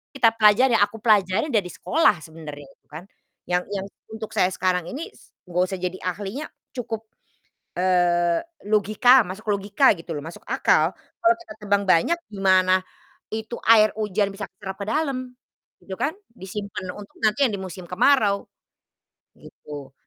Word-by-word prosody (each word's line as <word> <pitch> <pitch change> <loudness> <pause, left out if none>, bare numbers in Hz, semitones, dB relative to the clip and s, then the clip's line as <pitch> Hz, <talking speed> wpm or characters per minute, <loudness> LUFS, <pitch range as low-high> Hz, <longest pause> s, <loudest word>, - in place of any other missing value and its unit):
Kita 235 -4 +5
pelajari 225 +3 +5
yang 205 - +5
aku 225 0 -12
pelajarin 210 - +3
dari 215 -8 +1
sekolah 305 - +2
sebenarnya 155 -3 -10
itu, - - -25
kan, 155 +3 -10 0.5
yang 180 0 +1
yang 195 -1 -3 0.3
untuk 220 -1 -6
saya - - +2
sekarang 180 -2 0
ini 310 - -6
s - - -22 0.2
enggak 180 +1 +1
usah - - -2
jadi 185 0 -3
ahlinya, 205 - -4 0.2
cukup, 230 -4 -5 0.8
eee, 175 -2 +2 0.2
logika 215 +5 +5
masuk 200 +1 -7
logika 200 +7 +3
gitu, 165 -3 -7
loh, 145 - -7
masuk 165 - -9
akal, - - +2 0.2
kalau 345 0 +5
kita - - -10
tebang 200 -1 +1
banyak, 185 - +3 0.2
gimana 185 -1 +3 0.5
itu 220 +2 -5
air 215 -1 +7
hujan 205 -2 -1
bisa 195 -2 -7
keserap 190 0 -8
ke - - -3
dalam 255 -4 -2 0.4
gitu, 190 - -10
kan? 285 +11 -1 0.2
Disimpan 200 -2 -6
untuk 205 -1 -12
nanti 220 +6 +3
yang 235 - 0
di 200 - -4
musim 185 -1 -8
kemarau, 205 +1 +2 0.9
gitu. 145 -3 -11
200 Hz, 155 wpm, -23 LUFS, 180-225 Hz, 0.9 s, air